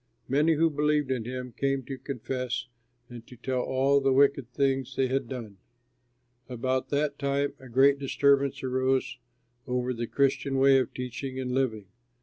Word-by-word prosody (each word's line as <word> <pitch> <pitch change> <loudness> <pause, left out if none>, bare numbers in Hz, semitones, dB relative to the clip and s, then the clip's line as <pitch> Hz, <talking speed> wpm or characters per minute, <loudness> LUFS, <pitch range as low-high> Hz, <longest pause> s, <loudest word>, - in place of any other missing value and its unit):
Many 150 +5 +3
who 165 +1 +3
believed 150 -1 +1
in 120 -4 -2
him 125 0 -5
came 135 +3 -1
to 135 +2 -6
confess 125 -1 -4 0.4
and 120 -1 -11
to 125 - -12
tell 125 +1 -2
all 135 +2 +2
the 135 0 +2
wicked 140 -2 +3
things 135 -1 0
they 130 - +2
had 135 -1 -1
done. 115 -7 -7 0.9
About 130 +1 -2
that 145 0 -1
time 140 0 0
a 130 -1 -13
great 135 +3 +4
disturbance 140 0 +2
arose 130 0 0 0.5
over 125 0 -1
the 120 -1 -4
Christian 135 0 +1
way 135 0 +6
of 130 - -2
teaching 130 +1 -5
and 125 -1 -3
living. 125 -6 -1
130 Hz, 160 wpm, -28 LUFS, 125-140 Hz, 0.9 s, way